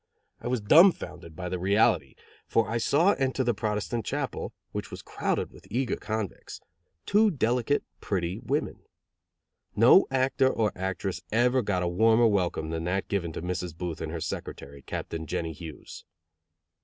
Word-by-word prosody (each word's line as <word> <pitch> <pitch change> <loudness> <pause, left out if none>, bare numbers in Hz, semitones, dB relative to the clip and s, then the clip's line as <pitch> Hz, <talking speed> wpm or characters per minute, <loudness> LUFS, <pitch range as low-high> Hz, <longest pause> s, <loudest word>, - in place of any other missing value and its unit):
I - - -6
was 125 -2 0
dumbfounded 150 - +4
by 90 -1 -5
the 90 0 -3
reality, 100 +4 +2 0.3
for 115 - +2
I 115 +1 -1
saw 160 - +4
enter 130 0 +1
the 120 -1 +1
Protestant 110 +2 -2
chapel, - - -3 0.2
which - - -5
was - - -8
crowded - - -2
with - - -16
eager 125 +3 0
convicts, 110 -3 -5 0.5
two 215 +2 +4
delicate, 125 - +1 0.2
pretty 90 -2 -2
women. - - -2 1.0
No 120 - +7
actor 130 0 +2
or 110 -5 +1
actress 95 0 -3
ever 125 +3 +3
got 95 -5 -1
a - - 0
warmer 110 +6 +4
welcome 90 -7 +1
than 80 0 -3
that 95 +2 -1
given 90 -5 -1
to - - -6
Mrs. 90 -2 -4
Booth 85 -2 -4
and 80 -1 -4
her 85 - -4
secretary, 70 -2 -6
Captain 80 +4 -5
Jennie 80 +1 -3
Hughes. 80 0 -10
105 Hz, 155 wpm, -27 LUFS, 90-120 Hz, 1.0 s, No